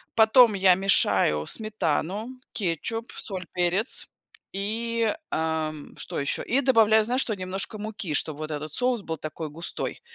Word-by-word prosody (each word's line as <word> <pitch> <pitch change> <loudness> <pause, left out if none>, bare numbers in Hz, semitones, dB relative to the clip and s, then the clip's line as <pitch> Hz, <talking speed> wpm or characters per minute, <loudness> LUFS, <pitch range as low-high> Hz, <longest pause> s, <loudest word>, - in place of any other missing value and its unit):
Потом 225 0 +6
я 190 -1 +5
мешаю 95 - +3
сметану, 210 0 -2 0.2
кетчуп, 225 +5 -2
соль, 185 -3 -6
перец 180 +6 +1 0.5
и, 225 +4 -1 0.2
э, - - 0
м, 160 -2 -3
что - - -4
ещё. 140 - -1
И 265 +3 +1
добавляю, 220 -4 +4
знаешь, 250 +3 +2
что? 220 - 0
Немножко 190 +3 -2
муки, 210 -6 -5
чтоб 150 0 +1
вот 155 0 -6
этот 150 +1 -4
соус 245 0 0
был 160 -3 -5
такой 155 +1 -6
густой. 165 +3 -5
195 Hz, 150 wpm, -25 LUFS, 160-225 Hz, 0.5 s, Потом